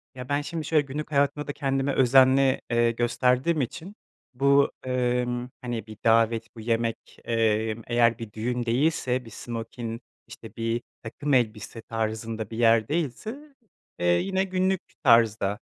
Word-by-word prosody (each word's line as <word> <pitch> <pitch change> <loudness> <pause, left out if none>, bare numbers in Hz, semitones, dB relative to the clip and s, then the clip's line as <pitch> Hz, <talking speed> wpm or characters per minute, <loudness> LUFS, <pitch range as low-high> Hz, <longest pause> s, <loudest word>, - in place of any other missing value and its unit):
Ya, 125 +1 -8
ben 145 +1 +1
şimdi 160 +1 -5
şöyle, 155 0 +3
günlük 150 +3 -6
hayatımda 145 +1 +1
da, 145 - -3
kendime 135 0 -1
özenli, 130 +1 +4
eee, 120 0 +3
gösterdiğim 125 +6 +1
için, 165 - -6 0.4
bu, 140 +2 +3
emm, 125 -1 -1
hani 120 -3 -4
bir 110 -1 -10
davet, 115 0 +2
bu - - -10
yemek, 115 0 -2
emm, 110 -1 0
eğer 120 -1 +3
bir 115 -2 -7
düğün 120 +2 -2
değilse, 130 0 0
bir - - -11
smokin, 115 +1 -6 0.3
işte, 110 -2 -12
bir 115 +1 -1 0.2
takım 145 +6 -3
elbise 115 -2 0
tarzında 110 -1 -4
bir 110 - -7
yer 115 -1 +4
değilse, 195 - -4 0.4
eee, 90 - -1
yine 190 - +2
günlük 190 0 0 0.2
tarzda, 115 -5 +4
120 Hz, 145 wpm, -26 LUFS, 115-140 Hz, 0.4 s, özenli